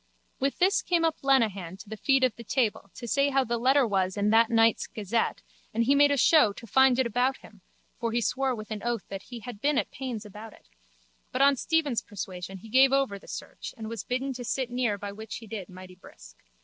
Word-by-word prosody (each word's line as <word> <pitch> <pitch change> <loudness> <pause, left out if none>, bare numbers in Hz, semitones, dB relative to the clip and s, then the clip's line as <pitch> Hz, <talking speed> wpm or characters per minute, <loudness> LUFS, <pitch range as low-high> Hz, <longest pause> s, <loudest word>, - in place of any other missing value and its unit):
With 275 +1 -1
this 380 +3 +3
came 340 -2 +1
up 325 - 0
Lenehan 210 -10 +1
to 205 - -13
the 220 - -6
feet 270 +4 +2
of 255 -3 +2
the 235 - -10
table 225 -4 -1
to 240 - -8
say 280 +4 +2
how 270 -1 +2
the 235 -1 -2
letter 265 +3 +4
was 190 -3 0
in 205 +1 +1
that 225 0 +5
night's 225 -1 +3
gazette 215 +2 -2 0.3
and 230 - +2
he 265 +4 +3
made 285 0 +5
a 285 - +1
show 265 -5 +5
to 230 - -11
find 265 +3 +4
it 260 - +2
about 250 +3 +1
him 210 -3 -17 0.4
(for 230 -1 -1
he 235 - +1
swore 260 +2 0
with 215 -1 -9
an 215 -1 -4
oath 235 -3 -2
that 195 -1 -6
he 240 +2 -10
had 230 -3 -9
been 290 +1 +2
at - - -1
pains 250 -5 -5
about 210 +1 -10
it) - - -22 0.6
but 260 - +2
on 280 0 +5
Stephen's 295 -3 0
persuasion 190 -2 -7
he 190 - -13
gave 260 +3 +5
over 270 -7 +1
the - - -18
search - - -8
and 220 -1 -6
was 230 -3 -5
bidden 260 +2 -2
to 245 0 -7
sit 250 +1 -2
near 245 -4 0
by 200 0 -6
which 220 +2 -8
he 230 - -8
did 205 -3 -7
mighty 185 0 -11
brisk. 180 - -16
235 Hz, 240 wpm, -27 LUFS, 210-265 Hz, 0.6 s, that